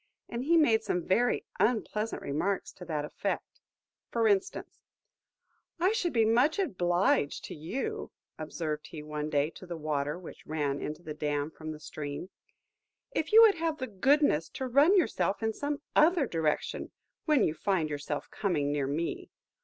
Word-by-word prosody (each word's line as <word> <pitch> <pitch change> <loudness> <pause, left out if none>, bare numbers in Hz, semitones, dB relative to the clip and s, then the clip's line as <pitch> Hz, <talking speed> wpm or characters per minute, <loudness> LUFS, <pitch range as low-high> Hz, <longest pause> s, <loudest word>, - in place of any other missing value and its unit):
And 235 +1 -4
he 335 +3 +5
made 230 -9 +4
some 180 -5 -2
very 240 +6 +2
unpleasant 220 -1 0
remarks 180 +8 -1
to 180 - -11
that 155 -3 -2
effect. - - -4 0.5
For 230 -1 +2
instance: 200 -2 0 1.0
"I 365 +4 +3
should 360 -6 0
be 225 -4 +3
much 245 - +3
obliged 180 - +1
to - - -7
you," 275 - -4 0.3
observed 155 -1 -4
he 150 -2 -8
one 150 0 -4
day 145 +1 +1
to 185 - -12
the 170 -1 -5
water 150 -1 -1
which 180 - -11
ran 145 -2 -1
into 155 +3 -5
the 155 - -5
dam 150 0 -2
from 155 0 -7
the 155 - -8
stream, 150 +3 -6 0.8
"if 315 - -2
you 450 +2 +9
would 410 -6 +5
have 325 -2 0
the 260 - -3
goodness 255 - +2
to 260 - -4
turn 300 +10 +6
yourself 225 - +1
in 220 0 +1
some 285 +4 -3
other 320 -1 +5
direction, 160 -7 -1 0.4
when 305 -3 +4
you 155 - +2
find 165 -2 0
yourself 145 0 -3
coming 150 -8 0
near 145 -2 0
me. 155 +5 -3
185 Hz, 165 wpm, -30 LUFS, -, 1.0 s, you